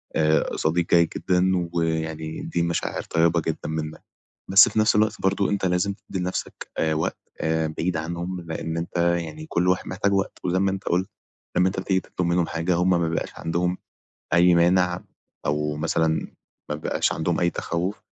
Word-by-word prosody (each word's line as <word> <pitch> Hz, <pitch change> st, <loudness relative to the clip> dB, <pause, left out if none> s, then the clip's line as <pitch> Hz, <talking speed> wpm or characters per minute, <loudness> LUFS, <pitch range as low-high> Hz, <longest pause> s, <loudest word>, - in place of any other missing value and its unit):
آآ، 80 Hz, 0 st, +2 dB
صديق 85 Hz, +2 st, +1 dB
جيد 85 Hz, -1 st, +5 dB
جدًا 90 Hz, +1 st, +2 dB, 0.2 s
ويعني 80 Hz, -1 st, -2 dB
دي 85 Hz, -, -2 dB
مشاعر 85 Hz, 0 st, -1 dB
طيبة 85 Hz, 0 st, +2 dB
جدًا 80 Hz, -, -3 dB
منّك، 80 Hz, 0 st, -4 dB, 0.5 s
بس 95 Hz, +1 st, +8 dB
في -, -, -3 dB
نفس 110 Hz, 0 st, +4 dB
الوقت 105 Hz, 0 st, +2 dB
برضه 95 Hz, +1 st, +2 dB
أنت 100 Hz, -1 st, -1 dB
لازم 90 Hz, +2 st, +1 dB
تدّي 100 Hz, -1 st, -7 dB
لنفسك 90 Hz, +1 st, -4 dB
آآ، 80 Hz, -1 st, +2 dB
وقت 80 Hz, -, -1 dB, 0.2 s
آآ 80 Hz, -1 st, 0 dB
بعيد 90 Hz, 0 st, 0 dB
عنهم 85 Hz, +3 st, -4 dB
لإن 80 Hz, -1 st, -4 dB
أنت 85 Hz, +1 st, -4 dB
يعني 85 Hz, -, 0 dB
كل 90 Hz, -, 0 dB
واحد 90 Hz, -, +1 dB
محتاج 100 Hz, +1 st, 0 dB
وقت 95 Hz, 0 st, 0 dB
و 90 Hz, -, +1 dB
زي 90 Hz, -, +2 dB
ما 95 Hz, 0 st, +2 dB
أنت 95 Hz, +1 st, -4 dB
قلت، 90 Hz, +3 st, +1 dB, 0.5 s
لما 90 Hz, +1 st, +5 dB
أنت 95 Hz, 0 st, -2 dB
بتيجي 95 Hz, 0 st, +1 dB
تطلب 90 Hz, -1 st, -3 dB
منهم 85 Hz, -1 st, +2 dB
حاجة 85 Hz, +2 st, 0 dB
هُم 90 Hz, +2 st, +2 dB
ما 90 Hz, -, +4 dB
بيبقاش 80 Hz, -, -2 dB
عندهم 90 Hz, +2 st, -1 dB, 0.6 s
أي 85 Hz, +1 st, +6 dB
مانع، 90 Hz, +1 st, +3 dB, 0.4 s
أو 75 Hz, 0 st, 0 dB
مثلًا 80 Hz, +1 st, 0 dB, 0.4 s
ما 75 Hz, -, -1 dB
بيبقاش 75 Hz, -, 0 dB
عندهم 80 Hz, +1 st, -1 dB
أي 85 Hz, -, +3 dB
تخوُّف 90 Hz, +4 st, -3 dB
85 Hz, 180 wpm, -24 LUFS, 80-95 Hz, 0.6 s, بس